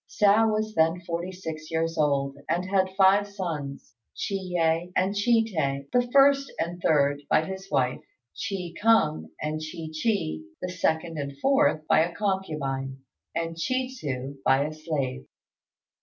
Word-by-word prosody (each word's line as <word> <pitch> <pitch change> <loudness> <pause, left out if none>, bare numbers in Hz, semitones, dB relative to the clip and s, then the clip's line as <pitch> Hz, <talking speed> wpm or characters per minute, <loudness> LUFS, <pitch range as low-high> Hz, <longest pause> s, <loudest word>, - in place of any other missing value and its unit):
Hsiao 210 +2 +4
was 215 0 -1
then 165 0 +3
forty 170 +1 -4
six 160 -4 -7
years 165 0 -1
old, 140 -3 +1
and 175 +2 0
had 190 0 +1
five 200 +1 +5
sons; 165 - -5 0.2
Chi - - -3
yeh 175 -3 0
and 190 +2 +2
Chi 225 +2 +3
tê, 140 -8 -2
the 245 0 +2
first 275 0 +5
and 175 +1 -3
third, 145 -2 +2
by 155 - +3
his 190 +2 -7
wife; 125 -5 +1 0.5
Chi 180 -4 -4
kung 210 -9 +3
and 155 +1 -3
Chi 155 +1 -6
chi, 155 - -1 0.2
the 180 - -4
second 165 -2 -1
and 140 -1 -5
fourth, 270 - +3
by 155 - +4
a 170 +2 +1
concubine; 150 -10 -2 0.4
and 165 0 -2
Chi 255 +8 -1
tsu, 140 - -5
by 135 +2 +3
a 155 - -4
slave. 150 - -3
165 Hz, 155 wpm, -26 LUFS, 150-195 Hz, 0.5 s, five